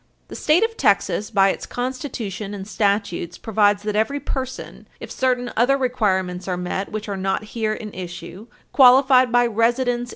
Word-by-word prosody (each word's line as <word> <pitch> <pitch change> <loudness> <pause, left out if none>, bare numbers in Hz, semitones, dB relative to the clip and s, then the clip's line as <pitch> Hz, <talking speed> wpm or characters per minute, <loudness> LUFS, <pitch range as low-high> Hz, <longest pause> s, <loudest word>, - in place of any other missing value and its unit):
The - - -8
State 310 +7 +3
of 455 0 -2
Texas 200 0 +1
by 195 -3 +3
its - - -4
Constitution 240 -6 -5
and 195 -1 -8
statutes 200 -5 -1
provides 205 -1 +1
that 210 0 -3
every 250 +7 0
person, 260 -2 -6
if - - -9
certain 250 -2 -1
other 245 +5 +3
requirements 190 -9 -1
are 180 -1 -2
met 180 +2 -4
which 215 0 -5
are 200 - -3
not 190 +1 -2
here 220 -2 -1
in 215 -1 -8
issue, 180 +3 -8 0.2
qualified 260 -1 +6
by 245 0 +4
residence - - -1
Page 225 0 -7 0.3
321 245 -1 0
U. - - -4
S. - - -15
215 Hz, 190 wpm, -21 LUFS, 195-250 Hz, 0.3 s, qualified